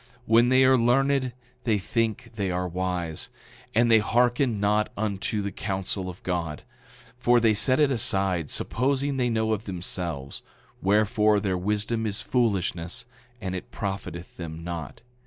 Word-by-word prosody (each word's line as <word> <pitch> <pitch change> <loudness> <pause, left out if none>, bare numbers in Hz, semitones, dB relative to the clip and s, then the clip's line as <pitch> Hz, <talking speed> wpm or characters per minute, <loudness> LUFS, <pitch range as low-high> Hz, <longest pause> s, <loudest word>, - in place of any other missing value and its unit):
When 115 +2 +5
they 130 0 +5
are 130 -1 +5
learned 130 +2 +2 0.3
they 110 -3 +2
think 115 +3 -2
they 100 -4 -2
are 90 0 -1
wise, 90 -2 -3 0.5
and 120 +1 +4
they 110 - +7
hearken 120 +1 +2
not 105 +1 +2
unto 105 0 -1
the 100 - -3
counsel 95 -1 -3
of 90 - -10
God, 85 -4 -3 0.6
for 120 0 +4
they 115 -2 +4
set 130 +6 +2
it 145 -2 +4
aside, 95 - +1
supposing 135 +2 0
they 125 -2 +1
know 110 -1 +1
of 110 0 -3
themselves, 85 -6 -4 0.4
wherefore, 105 +1 +3
their 95 -2 -1
wisdom 105 +4 -1
is 105 -1 -2
foolishness 95 -8 -1 0.3
and 95 -5 -4
it 95 - -6
profiteth 95 -3 -5
them 80 -1 -6
not. 85 0 -6
105 Hz, 150 wpm, -26 LUFS, 90-120 Hz, 0.6 s, they